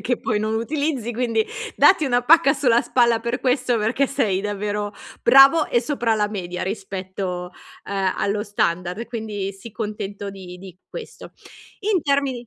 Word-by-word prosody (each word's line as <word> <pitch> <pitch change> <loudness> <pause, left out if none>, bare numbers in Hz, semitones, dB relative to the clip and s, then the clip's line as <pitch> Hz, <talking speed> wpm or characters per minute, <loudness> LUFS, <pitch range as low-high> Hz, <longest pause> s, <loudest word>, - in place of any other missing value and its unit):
che 245 -1 0
poi 215 -2 -1
non 215 +1 -1
utilizzi 270 0 -2
quindi 230 -2 0 0.3
datti 320 -6 +5
una 245 -1 +2
pacca 305 +1 +5
sulla 245 -4 +3
spalla 235 -2 +2
per 235 +2 -3
questo 250 -2 +1
perché 225 +6 +1
sei 215 -9 0
davvero 205 0 -3 0.3
bravo 275 +4 +7
e 240 - +1
sopra 235 -4 0
la 210 -1 0
media 180 -4 -5
rispetto, 190 -2 -4 0.3
uhm, 195 -2 -1
allo 205 +1 -1
standard, 180 0 -1
quindi 210 -4 -4
sii 195 +4 -11
contento 205 -2 -5
di 185 -2 -10
di 185 -1 -12
questo. - - -9 0.5
In 405 -2 +1
termini 275 -4 0
220 Hz, 155 wpm, -22 LUFS, 200-255 Hz, 0.5 s, bravo